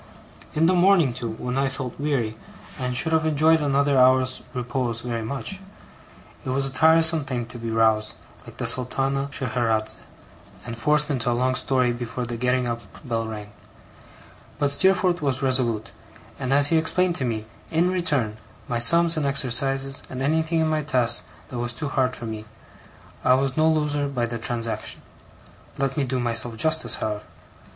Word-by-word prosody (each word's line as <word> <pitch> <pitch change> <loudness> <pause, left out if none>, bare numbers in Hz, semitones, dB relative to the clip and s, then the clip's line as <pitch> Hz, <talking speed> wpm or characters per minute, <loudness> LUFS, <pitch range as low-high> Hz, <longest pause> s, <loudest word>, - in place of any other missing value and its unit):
In 160 +2 +3
the 180 - +4
morning, 180 -7 +4
too, 120 -1 -4
when 125 +3 -3
I 135 0 +1
felt 130 -2 -6
weary, 135 -7 -1 0.4
and 125 -1 -1
should 160 - +3
have 160 0 +3
enjoyed 160 +1 +3
another 140 -1 +2
hour's 130 0 +4
repose 120 -2 -2
very 120 -2 -3
much, 140 - -4 0.8
it 135 - -5
was 135 +1 0
a 135 - -4
tiresome 160 +2 +4
thing 125 -4 -3
to 120 +1 -8
be 115 0 -4
roused, 110 -1 +2 0.3
like - - -12
the - - -3
Sultana 135 +2 0
Scheherazade, 110 -4 -1 0.7
and 115 -1 -5
forced 150 +5 +2
into 125 -3 0
a 120 - +1
long 130 +1 +1
story 125 -1 +2
before 120 +1 -4
the 120 0 -5
getting 125 +1 0
up 115 0 -3 0.3
bell 115 -2 -1
rang; 105 -2 -7 1.1
but 145 -1 +1
Steerforth 180 +2 +3
was 140 -2 +2
resolute; 125 -5 +1 0.5
and 130 -1 -3
as 140 +1 +4
he 165 - +3
explained 180 +3 +1
to - - -2
me, 110 -3 -2 0.2
in 170 +3 +2
return, 145 -12 0 0.3
my 120 -1 -1
sums 170 +7 +6
and 145 -2 0
exercises, 135 0 0
and 130 0 -4
anything 160 +3 +1
in 160 - +2
my 155 -1 0
tasks 125 -5 +1 0.2
that 125 - -5
was 120 0 -1
too 145 +3 -4
hard 130 -1 0
for 120 - -7
me, 110 -1 -6 0.8
I 125 - +5
was 135 0 0
no 155 0 +3
loser 150 -2 +1
by 125 -4 -1
the 115 0 -5
transaction. 115 0 -3 0.7
Let 135 -1 -1
me 145 -3 0
do 130 0 -2
myself 115 -1 -1
justice, 160 +6 +1
however. 105 -1 -3
130 Hz, 175 wpm, -24 LUFS, 120-150 Hz, 1.1 s, sums